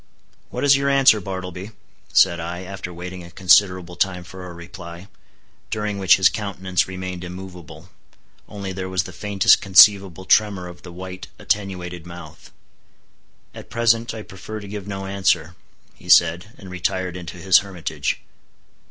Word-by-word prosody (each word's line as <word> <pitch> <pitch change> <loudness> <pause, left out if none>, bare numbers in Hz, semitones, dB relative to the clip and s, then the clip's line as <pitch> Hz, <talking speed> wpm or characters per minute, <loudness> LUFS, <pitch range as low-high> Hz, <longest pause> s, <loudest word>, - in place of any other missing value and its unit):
"What - - -4
is 140 -1 +6
your 140 0 +1
answer, 135 -6 +5
Bartleby?" 95 0 -6 0.4
said 85 - +4
I, 85 +2 -5
after 95 -1 -7
waiting 90 +1 -8
a 85 - -12
considerable 90 -1 +3
time 90 0 -1
for 90 +1 -10
a - - -8
reply, 85 +1 -10 0.6
during 105 -2 -3
which 95 -2 +5
his 95 - +5
countenance 95 -3 -1
remained 95 -1 -6
immovable, 90 -2 -10 0.6
only 100 -2 -6
there 95 0 -5
was 95 -1 0
the - - -10
faintest 100 -2 +3
conceivable 95 -1 +5
tremor 100 -3 +2
of 90 0 -12
the 90 - -11
white 95 +1 -8
attenuated 90 -4 -3
mouth. 85 -2 -12 1.0
"At - - -11
present 115 0 +1
I 110 - -7
prefer 105 +3 -8
to 100 - -10
give 100 -1 -7
no 95 -1 -5
answer," 95 -3 0 0.4
he - - -16
said, 85 +5 +4
and 95 -2 -11
retired 90 0 -2
into 90 0 -8
his 95 +1 +5
hermitage. 85 -6 -4
95 Hz, 150 wpm, -22 LUFS, 90-100 Hz, 1.0 s, is